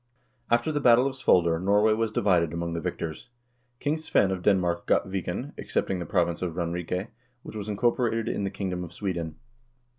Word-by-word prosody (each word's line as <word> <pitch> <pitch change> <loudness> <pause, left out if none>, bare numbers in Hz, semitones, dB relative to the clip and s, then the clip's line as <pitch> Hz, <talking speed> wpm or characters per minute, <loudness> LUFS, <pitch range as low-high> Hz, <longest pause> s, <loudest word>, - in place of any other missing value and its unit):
After 120 +6 +2
the 145 -1 -1
battle 125 0 +6
of 135 - -1
Svolder 85 -10 +3
Norway 105 +3 +4
was 110 0 0
divided 90 -7 +2
among 85 0 -3
the 85 - -2
victors. 80 +8 -5 0.5
King 145 +2 0
Svein 130 -11 +2
of 95 -1 -2
Denmark 90 -3 +1
got - - +2
Viken, 95 - -4
excepting 95 - -1
the 85 - -5
province 85 -4 +1
of 85 -3 -3
Ranrike, 90 +3 -2 0.3
which - - -9
was 105 0 -5
incorporated 115 +1 +1
in 100 - -1
the 100 - 0
kingdom 95 -2 -3
of 85 -1 -9
Sweden. 85 -5 -3
95 Hz, 180 wpm, -27 LUFS, 85-115 Hz, 0.5 s, battle